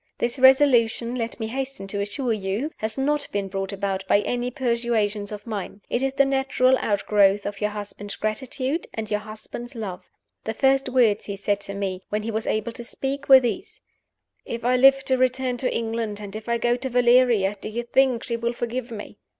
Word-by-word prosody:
"This 240 Hz, +3 st, -1 dB
resolution, 250 Hz, -3 st, +5 dB
let 230 Hz, -1 st, -3 dB
me 220 Hz, -, -2 dB
hasten 265 Hz, -2 st, -4 dB
to 200 Hz, -, -2 dB
assure 230 Hz, +4 st, -1 dB
you, 210 Hz, +8 st, -2 dB
has 220 Hz, +2 st, -4 dB
not 290 Hz, +2 st, +1 dB
been 200 Hz, -1 st, -2 dB
brought 195 Hz, 0 st, -4 dB
about 195 Hz, -1 st, -2 dB
by 205 Hz, -, +4 dB
any 245 Hz, +2 st, -2 dB
persuasions 235 Hz, -5 st, -1 dB
of 210 Hz, -1 st, -7 dB
mine. 210 Hz, -2 st, -5 dB
It 240 Hz, -, +1 dB
is 270 Hz, 0 st, 0 dB
the 275 Hz, -, +5 dB
natural 265 Hz, -1 st, +2 dB
outgrowth 205 Hz, -1 st, +2 dB
of 205 Hz, 0 st, -5 dB
your 210 Hz, -, +1 dB
husband's 205 Hz, -1 st, -7 dB
gratitude 260 Hz, +7 st, -2 dB
and 220 Hz, -1 st, -5 dB
your 210 Hz, -, +1 dB
husband's 220 Hz, +4 st, -9 dB
love. 200 Hz, -6 st, -6 dB, 0.3 s
The 220 Hz, -, -4 dB
first 270 Hz, +1 st, +2 dB
words 235 Hz, -5 st, +3 dB
he 200 Hz, -, -4 dB
said 205 Hz, +1 st, -1 dB
to 200 Hz, 0 st, -6 dB
me, 190 Hz, -2 st, -3 dB
when 210 Hz, 0 st, -2 dB
he 225 Hz, -, -3 dB
was 220 Hz, 0 st, -3 dB
able 215 Hz, +2 st, -1 dB
to 235 Hz, +1 st, -8 dB
speak, 275 Hz, +4 st, -4 dB
were 265 Hz, -1 st, +10 dB
these: 260 Hz, +9 st, -4 dB, 0.6 s
'If 235 Hz, 0 st, -6 dB
I 250 Hz, +1 st, +3 dB
live 270 Hz, +1 st, +6 dB
to 260 Hz, -2 st, +2 dB
return 255 Hz, -1 st, +1 dB
to 250 Hz, -, 0 dB
England, 225 Hz, -2 st, -2 dB
and 205 Hz, -1 st, -8 dB
if 220 Hz, +2 st, -7 dB
I 235 Hz, -, +2 dB
go 240 Hz, +1 st, +2 dB
to 260 Hz, +1 st, -4 dB
Valeria, 240 Hz, -5 st, +4 dB
do -, -, -5 dB
you 235 Hz, +2 st, -3 dB
think 250 Hz, 0 st, +2 dB
she 235 Hz, -2 st, -2 dB
will 235 Hz, +1 st, -1 dB
forgive 240 Hz, +1 st, -4 dB
me? 215 Hz, -3 st, -8 dB
235 Hz, 205 wpm, -24 LUFS, 210-255 Hz, 0.6 s, were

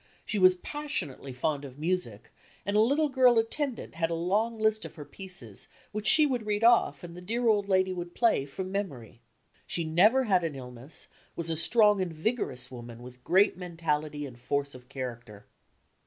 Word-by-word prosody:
She 210 Hz, -, -2 dB
was 185 Hz, -1 st, +7 dB
passionately 180 Hz, -, -4 dB
fond 140 Hz, +3 st, -2 dB
of 135 Hz, -2 st, -10 dB
music 150 Hz, -, -3 dB, 0.3 s
and 200 Hz, -, -1 dB
a -, -, +5 dB
little 285 Hz, +7 st, +3 dB
girl 255 Hz, -3 st, +4 dB
attendant 245 Hz, +3 st, -2 dB
had 165 Hz, 0 st, -1 dB
a 165 Hz, -, -1 dB
long 210 Hz, +7 st, 0 dB
list 220 Hz, 0 st, +1 dB
of -, -, -9 dB
her 150 Hz, -3 st, -9 dB
pieces 180 Hz, -, -5 dB, 0.2 s
which 215 Hz, +1 st, -1 dB
she 310 Hz, -, +7 dB
would 245 Hz, -6 st, -2 dB
read 210 Hz, +1 st, 0 dB
off 230 Hz, -12 st, +4 dB
and 170 Hz, -1 st, -9 dB
the 180 Hz, -, -9 dB
dear 230 Hz, +6 st, -1 dB
old 205 Hz, -2 st, +2 dB
lady 185 Hz, -1 st, +2 dB
would 175 Hz, -1 st, -6 dB
play 230 Hz, -, +2 dB
from 185 Hz, +6 st, -6 dB
mem 200 Hz, -1 st, -1 dB
ory. 120 Hz, -3 st, -13 dB, 0.5 s
She 170 Hz, -, -1 dB
never 200 Hz, +12 st, +4 dB
had 190 Hz, -7 st, +2 dB
an 160 Hz, -4 st, -2 dB
illness, 125 Hz, +2 st, -6 dB, 0.3 s
was 165 Hz, -1 st, -3 dB
a -, -, 0 dB
strong 210 Hz, +4 st, +4 dB
and 180 Hz, -2 st, -2 dB
vigorous 160 Hz, -, -2 dB
woman, 120 Hz, -1 st, -9 dB
with 125 Hz, 0 st, -13 dB
great 195 Hz, +2 st, +3 dB
mentality 155 Hz, -4 st, -2 dB
and 125 Hz, -3 st, -11 dB
force 140 Hz, +3 st, -2 dB
of 125 Hz, -1 st, -14 dB
character. 120 Hz, -5 st, -7 dB
175 Hz, 190 wpm, -29 LUFS, 140-215 Hz, 0.5 s, was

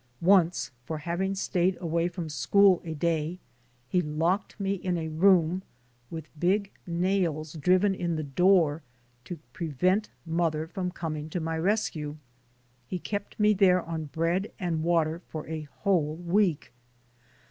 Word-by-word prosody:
Once, 175 Hz, -7 st, +4 dB
for 155 Hz, +5 st, -4 dB
having 175 Hz, +5 st, -2 dB
stayed 185 Hz, -1 st, +1 dB
away 170 Hz, -1 st, 0 dB
from 175 Hz, -2 st, -5 dB
school 185 Hz, +6 st, +4 dB
a 160 Hz, -1 st, -5 dB
day, 165 Hz, +1 st, -1 dB, 0.5 s
he 180 Hz, +7 st, +2 dB
locked 170 Hz, +7 st, -1 dB
me 195 Hz, 0 st, 0 dB
in 180 Hz, -2 st, -2 dB
a 160 Hz, -1 st, -3 dB
room, 175 Hz, +1 st, +3 dB, 0.5 s
with 160 Hz, -2 st, -7 dB
big 195 Hz, +4 st, +1 dB, 0.2 s
nails 170 Hz, -3 st, 0 dB
driven 185 Hz, +5 st, +3 dB
in 175 Hz, -3 st, -2 dB
the 155 Hz, -, -2 dB
door, 165 Hz, +1 st, +3 dB, 0.4 s
to 175 Hz, -, -7 dB, 0.2 s
prevent 180 Hz, +6 st, 0 dB, 0.2 s
mother 160 Hz, -2 st, 0 dB
from 180 Hz, +2 st, -3 dB
coming 155 Hz, -4 st, -5 dB
to 175 Hz, -, -2 dB
my 165 Hz, 0 st, -2 dB
rescue. 160 Hz, -5 st, -1 dB, 0.7 s
He 185 Hz, -, -3 dB
kept 205 Hz, +4 st, -5 dB
me 210 Hz, 0 st, +5 dB
there 185 Hz, -3 st, +4 dB
on 160 Hz, -1 st, -4 dB
bread 165 Hz, +6 st, -1 dB
and 170 Hz, -5 st, -1 dB
water 165 Hz, 0 st, +1 dB
for 155 Hz, -1 st, -6 dB
a 155 Hz, -1 st, -5 dB
whole 165 Hz, -7 st, +2 dB
week. 175 Hz, -1 st, 0 dB
170 Hz, 145 wpm, -28 LUFS, 160-185 Hz, 0.7 s, me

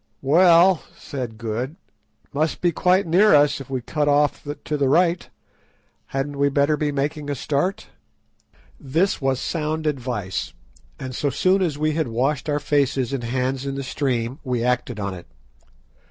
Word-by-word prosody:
"Well," 170 Hz, +4 st, +5 dB, 0.2 s
said 125 Hz, -5 st, -6 dB
Good, 120 Hz, +6 st, -4 dB, 0.5 s
"it -, -, -36 dB
must 155 Hz, +3 st, 0 dB
be 175 Hz, -, +2 dB
quite 185 Hz, +4 st, +2 dB
near 180 Hz, +2 st, +5 dB
us 145 Hz, -1 st, +3 dB
if 135 Hz, -, -11 dB
we 130 Hz, -2 st, -2 dB
cut 150 Hz, +4 st, -1 dB
off 145 Hz, 0 st, +2 dB, 0.2 s
to 150 Hz, -, -1 dB
the 140 Hz, -2 st, +1 dB
right. 170 Hz, +3 st, +2 dB, 0.8 s
Hadn't 140 Hz, +1 st, -3 dB
we 140 Hz, 0 st, +3 dB
better 140 Hz, +2 st, +2 dB
be 150 Hz, 0 st, -1 dB
making 145 Hz, +1 st, -2 dB
a 145 Hz, -, -1 dB
start?" 180 Hz, -, -1 dB, 0.9 s
This 160 Hz, +7 st, 0 dB
was 135 Hz, -1 st, +1 dB
sound 155 Hz, 0 st, -2 dB
advice, 120 Hz, -10 st, -3 dB, 0.5 s
and 130 Hz, 0 st, -6 dB
so 145 Hz, -, 0 dB
soon 185 Hz, +8 st, +2 dB
as 160 Hz, -6 st, 0 dB
we 155 Hz, +1 st, +1 dB
had 155 Hz, -2 st, -1 dB
washed 135 Hz, +6 st, -1 dB
our 145 Hz, 0 st, +1 dB
faces 140 Hz, -3 st, 0 dB
and 130 Hz, -3 st, -2 dB
hands 130 Hz, +2 st, -1 dB
in 135 Hz, -1 st, -3 dB
the 140 Hz, -, -4 dB
stream 130 Hz, -2 st, -2 dB
we 125 Hz, -4 st, -1 dB
acted 125 Hz, -2 st, -1 dB
on 100 Hz, -1 st, -3 dB
it. 90 Hz, -2 st, -10 dB
140 Hz, 170 wpm, -22 LUFS, 130-155 Hz, 0.9 s, Well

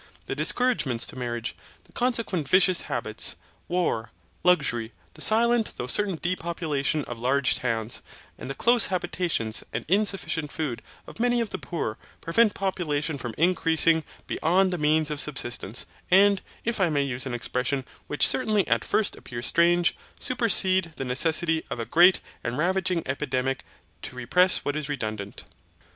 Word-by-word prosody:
The -, -, -3 dB
discouragements 155 Hz, -, +1 dB
to -, -, -10 dB
marriage, 120 Hz, -2 st, -4 dB, 0.3 s
the -, -, -24 dB
consequent 230 Hz, -, -1 dB
vicious 185 Hz, -1 st, +4 dB
habits, 110 Hz, -6 st, 0 dB, 0.3 s
war, 170 Hz, -11 st, -1 dB, 0.3 s
luxury, 130 Hz, -11 st, +2 dB, 0.2 s
the -, -, -10 dB
silent 230 Hz, +1 st, +3 dB
though -, -, -3 dB
certain 195 Hz, +8 st, +1 dB
depopulation 165 Hz, -5 st, -2 dB
of 120 Hz, -1 st, -7 dB
large 130 Hz, +1 st, +2 dB
towns, 115 Hz, -2 st, -1 dB, 0.4 s
and -, -, -7 dB
the 135 Hz, -, -4 dB
close 240 Hz, 0 st, +4 dB
habitations, 170 Hz, -, -1 dB
and -, -, -4 dB
insufficient 190 Hz, -5 st, 0 dB
food 140 Hz, -7 st, -3 dB, 0.2 s
of -, -, -12 dB
many 245 Hz, 0 st, +2 dB
of 230 Hz, -3 st, -2 dB
the -, -, -4 dB
poor, 135 Hz, -, -4 dB, 0.2 s
prevent 210 Hz, +6 st, +2 dB
population 160 Hz, -6 st, -2 dB
from 120 Hz, -3 st, -6 dB
increasing 165 Hz, -1 st, +3 dB, 0.2 s
beyond 185 Hz, +3 st, +1 dB
the 175 Hz, -, -3 dB
means 155 Hz, 0 st, +2 dB
of 150 Hz, -1 st, -2 dB
subsistence; 120 Hz, -5 st, -1 dB, 0.2 s
and, 195 Hz, +1 st, +5 dB, 0.2 s
if 230 Hz, -3 st, -1 dB
I 180 Hz, -, +3 dB
may 145 Hz, -2 st, +1 dB
use 130 Hz, -1 st, -1 dB
an 125 Hz, -, -3 dB
expression 125 Hz, +2 st, -2 dB, 0.2 s
which 145 Hz, -, +3 dB
certainly 215 Hz, -6 st, +1 dB
at 115 Hz, -1 st, +1 dB
first 215 Hz, -, 0 dB
appears 120 Hz, 0 st, -6 dB
strange, 175 Hz, +3 st, +3 dB, 0.2 s
supercede 190 Hz, -8 st, +3 dB
the 135 Hz, -, -5 dB
necessity 160 Hz, +5 st, +1 dB
of 115 Hz, -2 st, -5 dB
great 175 Hz, +3 st, +6 dB, 0.2 s
and 120 Hz, +2 st, -3 dB
ravaging 185 Hz, +1 st, 0 dB
epidemics 135 Hz, -1 st, -2 dB, 0.4 s
to 130 Hz, -, -7 dB
repress 180 Hz, +10 st, +3 dB
what 145 Hz, -, -1 dB
is 150 Hz, -1 st, -3 dB
redundant. 110 Hz, -7 st, -5 dB
160 Hz, 150 wpm, -26 LUFS, 125-185 Hz, 0.4 s, great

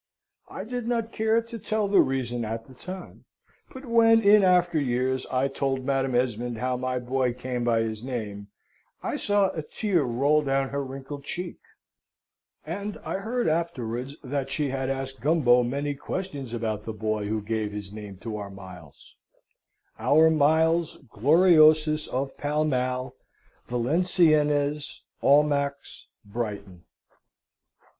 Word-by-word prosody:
I -, -, -6 dB
did 245 Hz, 0 st, -5 dB
not 230 Hz, -2 st, -1 dB
care 220 Hz, +1 st, +1 dB
to 230 Hz, 0 st, -8 dB
tell 215 Hz, 0 st, -1 dB
the 200 Hz, -, +5 dB
reason 120 Hz, -3 st, -1 dB
at 115 Hz, +1 st, -4 dB
the 130 Hz, -, -15 dB
time; 180 Hz, +7 st, -9 dB, 0.5 s
but 260 Hz, +1 st, -10 dB
when, 230 Hz, -1 st, +5 dB
in 205 Hz, +1 st, +7 dB
after 175 Hz, -3 st, +3 dB
years, 130 Hz, 0 st, -1 dB
I 130 Hz, +1 st, +1 dB
told 135 Hz, -1 st, -2 dB
Madam 135 Hz, -2 st, 0 dB
Esmond 120 Hz, -1 st, -1 dB
how 125 Hz, +2 st, -1 dB
my 130 Hz, 0 st, -2 dB
boy 125 Hz, 0 st, 0 dB
came 125 Hz, 0 st, -4 dB
by 115 Hz, -1 st, +2 dB
his 110 Hz, 0 st, -4 dB
name, 105 Hz, -6 st, -5 dB, 0.6 s
I -, -, -2 dB
saw 205 Hz, -2 st, +2 dB
a 160 Hz, -, -4 dB
tear 180 Hz, +3 st, 0 dB
roll 140 Hz, +4 st, +2 dB
down 135 Hz, -1 st, 0 dB
her 140 Hz, 0 st, -2 dB
wrinkled 135 Hz, +1 st, -8 dB
cheek, 175 Hz, +4 st, -5 dB, 1.1 s
and 200 Hz, +6 st, -5 dB
I -, -, -2 dB
heard 235 Hz, +3 st, -1 dB
afterwards 140 Hz, -6 st, -2 dB
that 135 Hz, 0 st, -3 dB
she 145 Hz, +1 st, -1 dB
had 135 Hz, 0 st, -2 dB
asked 135 Hz, -1 st, -4 dB
Gumbo 130 Hz, -4 st, +4 dB
many 140 Hz, +4 st, -2 dB
questions 140 Hz, -3 st, -5 dB
about 110 Hz, -3 st, -3 dB
the 110 Hz, -, -5 dB
boy 110 Hz, -1 st, -2 dB
who 110 Hz, +1 st, -1 dB
gave 105 Hz, 0 st, -2 dB
his 105 Hz, -1 st, -7 dB
name 105 Hz, -3 st, -8 dB
to 110 Hz, -2 st, -5 dB
our 100 Hz, -1 st, -6 dB
Miles 95 Hz, -6 st, -13 dB, 0.9 s
our 160 Hz, +2 st, +5 dB
Miles 160 Hz, +2 st, +2 dB
Gloriosus 155 Hz, -, +5 dB
of 135 Hz, +1 st, -3 dB
Pall 150 Hz, +1 st, 0 dB
Mall, 130 Hz, -2 st, -1 dB, 0.5 s
Valenciennes, 150 Hz, +1 st, +1 dB, 0.2 s
Almack's, 140 Hz, -1 st, +1 dB, 0.2 s
Brighton. 100 Hz, -5 st, -6 dB
135 Hz, 140 wpm, -26 LUFS, 120-160 Hz, 1.1 s, in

